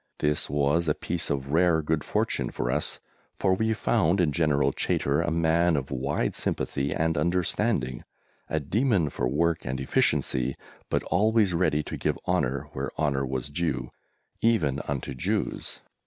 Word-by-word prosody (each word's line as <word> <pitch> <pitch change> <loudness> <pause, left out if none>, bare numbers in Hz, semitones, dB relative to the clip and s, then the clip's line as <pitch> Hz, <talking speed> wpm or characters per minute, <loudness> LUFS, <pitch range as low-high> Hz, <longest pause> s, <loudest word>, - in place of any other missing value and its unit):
This 75 0 +1
was 75 +4 +1
a 75 - +2
piece 85 0 -2
of 70 -1 -2
rare 80 0 +3
good 75 0 0
fortune - - -1
for - - -2
us, 75 +2 0 0.4
for 95 - +2
we 110 +4 +1
found 100 -5 +2
in 85 -4 +3
General 70 -3 +2
Chaytor 70 +3 0
a 85 - 0
man 85 +1 +2
of 70 -1 -3
wide 70 +2 -1
sympathy 70 +1 -1
and 80 -1 0
understanding, 85 - 0 0.5
a 80 - 0
demon 95 - +1
for 60 - -1
work 85 +5 +1
and 65 +1 -3
efficiency, 65 -1 +1 0.3
but - - 0
always 105 +1 +2
ready 85 -3 +1
to - - -6
give - - -1
honour 70 +3 0
where - - -3
honour 70 -3 +1
was 65 +1 -3
due 70 -6 -2 0.5
even 75 - +2
unto 70 -2 -3
Jews. 65 - -2
75 Hz, 155 wpm, -27 LUFS, 70-85 Hz, 0.5 s, rare